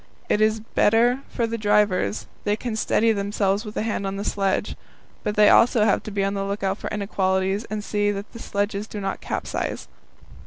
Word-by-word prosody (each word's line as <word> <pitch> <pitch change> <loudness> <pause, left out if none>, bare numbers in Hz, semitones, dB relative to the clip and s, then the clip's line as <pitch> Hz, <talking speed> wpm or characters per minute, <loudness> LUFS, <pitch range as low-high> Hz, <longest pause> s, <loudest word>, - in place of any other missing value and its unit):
It 210 - +2
is 215 0 +2
better 230 +3 +3
for 235 - -1
the 230 0 -3
drivers, 210 -1 +2 0.2
they 205 - +1
can 230 0 -4
steady 225 +1 +2
themselves 200 0 0
with 210 -2 -8
a - - 0
hand 210 -3 -2
on 195 - -3
the 200 - -4
sledge. 195 -1 0 0.5
But 210 - -2
they 210 0 +6
also 230 -1 +5
have 210 -2 +3
to - - -7
be 200 -1 -1
on 195 0 0
the 195 -1 -2
lookout 195 0 -2
for - - -4
inequalities, 195 0 0
and 215 -2 -4
see 205 0 0
that 205 0 -4
the 230 - -9
sledges 205 0 -2
do 210 - -6
not 195 -1 -3
capsize. - - -3
205 Hz, 200 wpm, -24 LUFS, 200-215 Hz, 0.5 s, they